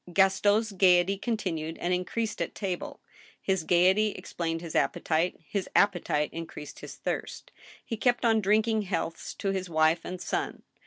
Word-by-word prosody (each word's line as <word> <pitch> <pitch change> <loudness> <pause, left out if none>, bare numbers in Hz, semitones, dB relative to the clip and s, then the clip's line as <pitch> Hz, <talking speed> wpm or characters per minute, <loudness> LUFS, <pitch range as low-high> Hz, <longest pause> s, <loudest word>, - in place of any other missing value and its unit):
Gaston's 205 +4 +3
gayety 185 0 +4
continued 185 -8 -3
and 175 +1 -1
increased 210 +4 -2
at - - -3
table. 185 -4 -4 0.4
His 190 -3 0
gayety 185 +5 +4
explained 165 -1 -4
his 170 -2 -7
appetite; 165 +2 +1
his 200 -3 -3
appetite 175 -7 +2
increased 165 -3 -8
his - - -9
thirst. - - -4 0.3
He 230 - -4
kept 245 +1 +2
on 225 -1 +4
drinking 215 +2 +2
healths 170 -4 -3
to 195 - -1
his 185 -2 -3
wife 160 +1 +3
and 180 0 -6
son. - - -3
190 Hz, 150 wpm, -28 LUFS, 170-210 Hz, 0.4 s, gayety